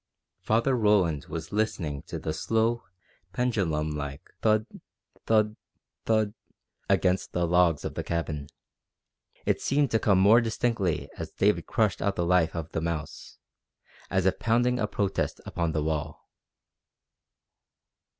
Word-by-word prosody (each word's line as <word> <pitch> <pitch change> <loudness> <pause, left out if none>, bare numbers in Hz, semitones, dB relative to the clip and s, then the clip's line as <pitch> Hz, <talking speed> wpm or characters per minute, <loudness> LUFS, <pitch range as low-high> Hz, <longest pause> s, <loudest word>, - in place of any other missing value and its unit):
Father 115 +4 +2
Roland 100 - +2
was 80 -1 -6
listening 90 -9 -1
to - - -5
the 80 - -3
slow, 115 +8 0 0.5
pendulum 95 - 0
like 70 -2 -6
thud, 110 -1 +3 0.6
thud, 110 -1 +3 0.5
thud, 110 -2 +2 0.6
against 95 -1 +1
the 85 0 +1
logs 85 -2 +3
of - - -3
the - - -4
cabin. 80 -4 -3 1.0
It - - +1
seemed 140 -2 +1
to 115 - +3
come 100 -4 +3
more 105 +5 +6
distinctly 115 -6 -1
as - - -4
David - - +1
crushed 110 -3 +1
out 100 -1 0
the 85 - 0
life 85 -2 +2
of 80 -1 -5
the 80 - -2
mouse, 80 -2 -5 0.7
as 95 -1 +1
if 95 - +2
pounding 120 +2 +2
a 105 - +1
protest 100 -2 -1
upon 85 -2 -1
the 80 -1 -1
wall. 75 -2 -3
95 Hz, 135 wpm, -27 LUFS, 80-110 Hz, 1.0 s, more